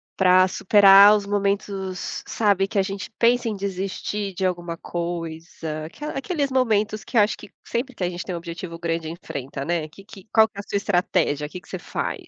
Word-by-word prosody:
para 185 0 +5
superar 200 +2 +7
os 205 - -5
momentos, 200 -2 -2
sabe, 200 -3 +2
que 205 0 -4
a 195 - +4
gente 195 -1 -5
pensa 240 0 +3
em 215 - -3
desistir 195 +1 -3
de 190 - -1
alguma 175 -2 -2
coisa. 165 -2 -5
Aquela 295 - -7
aqueles 280 -1 -2
momentos 215 -4 +1
que 240 - -3
eu - - +8
acho 210 +1 +2
que - - -12 0.2
sempre 250 +2 -3
que 185 - -4
a 175 - +1
gente 175 0 -5
tem 180 - -5
um - - -3
objetivo 170 0 -7
grande 165 -1 -2
enfrenta, 140 -5 -6
né. 165 -1 -1
Que 195 +6 -16
que 200 -2 -14
qual 220 -1 +6
que 215 - -21
é - - -5
a - - -15
sua - - -1
estratégia? 175 -7 0
Que 180 - -8
que 160 - -23
você 185 - -6
faz? - - -4
190 Hz, 210 wpm, -23 LUFS, 170-205 Hz, 0.2 s, eu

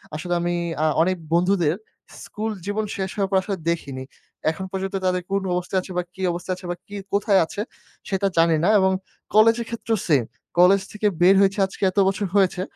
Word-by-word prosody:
আসলে 175 +3 -3
আমি 175 0 -1 0.3
আ - - +3 0.2
অনেক 185 +2 +2 0.2
বন্ধুদের 175 -3 +2 0.5
স্কুল 220 +1 -4
জীবন 210 +2 -1
শেষ 190 -1 -3
হওয়ার 195 -2 0
পর, 190 - +4
আসলে 195 0 -3
দেখিনি। 140 -6 -3 0.5
এখন 190 +4 -6
পর্যন্ত 195 0 -3
তাদের 180 0 +1
কোন 195 0 +1
অবস্থায় 180 +1 -1
আছে 185 - -11
বা 180 - +1
কি 190 - -10
অবস্থায় 180 +2 -3
আছে 185 - -12
বা - - -3
কি, 205 - -10 0.2
কোথায় 200 -1 +3
আছে? 200 - -5 0.5
সেটা 195 0 +1
জানিনা 165 +1 +3
এবং 190 0 +3 0.4
কলেজের 225 +2 +5
ক্ষেত্রেও 225 -1 -2
সেইম। 145 -7 +4 0.4
কলেজ 190 +2 +6
থেকে 210 0 0
বের 185 +2 +7
হয়েছি, 195 +1 +2
আজকে 190 - -9
এত - - -25
বছর 200 +2 0
হয়েছে। 190 -2 +3
190 Hz, 190 wpm, -23 LUFS, 175-200 Hz, 0.5 s, বের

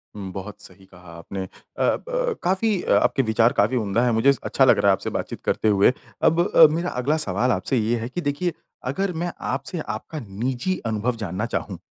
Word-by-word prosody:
हुँ, 95 -2 -6
बहुत 100 +2 -8
सही 95 +1 -15
कहा 90 -2 -15
आपने। 95 +3 -6
अ, - - -7 0.3
ब - - 0
काफ़ी 190 +2 +1
अ, - - -2
आपके - - +3
विचार 115 +1 +3
काफ़ी 110 +1 +2
उम्दा 110 +1 0
है। 120 - +2
मुझे 115 +4 +3
इस 140 - +3
अच्छा 135 - +3
लग - - +5
रहा 100 0 +2
है - - +7
आपसे - - -3
बातचीत - - -5
करते - - 0
हुए। 100 +1 +5 0.3
अब 165 - +4 0.2
अ, 160 - +10
मेरा 170 +3 -1
अगला 150 +5 +1
सवाल 100 +7 +1
आपसे 115 +5 0
ये 115 +1 +1
है 115 - -5
कि 175 - -4
देखिए 155 +4 -1 0.4
अगर 195 +6 -1
मैं 175 - -2 0.2
आपसे 180 - -3
आपका 155 0 -5
निजी 120 - -3
अनुभव 115 +2 -1
जानना 95 +5 -3
चाहूँ - - -3
120 Hz, 210 wpm, -23 LUFS, 100-160 Hz, 0.4 s, अ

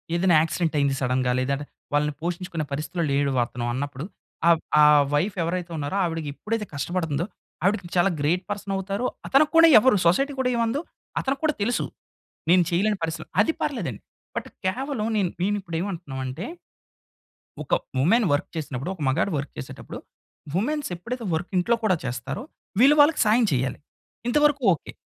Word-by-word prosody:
ఏదైనా 175 0 +4
యాక్సిడెంట్ 165 0 -1
అయ్యింది 140 -1 +2
సడెన్‌గా 125 0 +1
లేదంటే 140 +3 -1 0.3
వాళ్ళని 150 0 +2
పోషించుకునే 175 -1 -3
పరిస్థితిలో 160 +5 -2
లేడు 140 0 +2
వతను 120 0 -2
అన్నప్పుడు 140 +2 -4 0.4
ఆహ్, 170 -1 +6 0.2
ఆహ్, 150 -1 +7
వైఫ్ 180 +7 +1
ఎవరైతే 175 +1 -3
ఉన్నారో 145 +6 -2
ఆవిడకి 165 -3 -2
ఎప్పుడైతే 215 +7 -3
కష్టపడుతుందో 165 +1 -1 0.4
ఆవిడకి 190 -2 +1
చాలా 175 +2 +4
గ్రేట్ 170 +6 +1
పర్సన్ 205 -1 -3
అవుతారు. 195 +5 -2 0.2
అతనికి 290 +3 +4
కూడా 330 0 +9
ఎవరు 255 +1 +4
సొసైటీ 275 +12 +2
కూడా 255 -1 +2
ఏమందో 235 +4 0 0.4
అతనికి 270 +1 -2
కూడా 305 -2 +2
తెలుసు. 240 +4 0 0.7
నేను 180 0 +6
చేయలేని 200 +4 +1
పరిస్థితి‌లో 165 +1 -3
అది 325 - 0
పర్లేదండి. - - -3 0.3
బట్ - - -3 0.2
కేవలం 250 +3 -1
నేను, 185 -4 +1
నేను 205 +2 +1
ఇప్పుడు 170 -2 -5
ఏమంటున్నాం 170 -9 -5
అంటే 130 +8 -5 1.2
ఒక - - -4 0.3
వుమెన్ 215 - +4
వర్క్ 145 - -1
చేసినప్పుడు, 145 -1 -4
ఒక 170 - -12
మగాడు 165 +9 +1
వర్క్ 140 - -4
చేసేటప్పుడు 65 - -8 0.5
వుమెన్స్ 285 - -1
ఎప్పుడైతే 235 +7 -6
వర్క్ 165 +3 -2
ఇంట్లో 210 +7 +3
కూడా 200 -4 +3
చేస్తారో, 125 - -4 0.4
వీళ్ళు 275 +5 +7
వాళ్ళకి 295 +2 +6
సహాయం 225 +3 +4
చేయాలి. 130 +1 -1 0.5
ఇంతవరకు 295 +2 +3
ఓకే. 150 - -7
175 Hz, 155 wpm, -25 LUFS, 145-215 Hz, 1.2 s, కూడా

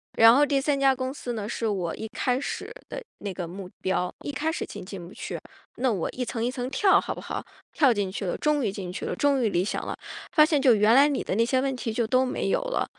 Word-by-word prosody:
然 225 +2 +8
后 290 - +5
第 280 -2 +1
3 280 -1 +1
家 270 -1 +4
公 255 0 -3
司 250 -3 -5
呢 215 -1 -4
是 230 - -3
我 185 -6 -1
一 220 - -6
开 250 -1 +1
始 280 - -5 0.2
的 - - -6 0.2
那 200 -2 -5
个 180 -1 -5
目 185 +2 -8
标， 185 -1 0
一 - - -3
开 310 +3 -1
始 325 - -3
进 - - -8
进 185 -3 -8
不 185 - -13
去， - - -6 0.4
那 255 0 +2
我 190 -6 -1
一 250 - -3
层 230 -1 -2
一 245 - 0
层 255 -1 -4
跳 380 +8 +4
好 - - -4
不 - - -8
好？ - - -5 0.3
跳 280 -5 +5
进 205 -4 -1
去 200 - -5
了， 175 - -2
终 300 -2 +1
于 210 - 0
进 185 -2 -6
去 - - -5
了， - - -2
终 280 -2 +2
于 220 - +3
理 180 0 +1
想 - - -2
了。 - - -3 0.4
发 305 -3 +6
现 300 -3 +1
就 255 -4 +6
原 210 +2 +4
来 275 +3 +7
你 285 -2 -1
的 - - -2
那 225 +4 +3
些 255 +3 +2
问 270 0 0
题 245 -2 -3
就 230 +1 0
都 255 +3 +3
没 255 - -2
有 - - +2
了， - - -1
245 Hz, 295 characters per minute, -26 LUFS, 205-275 Hz, 0.4 s, 然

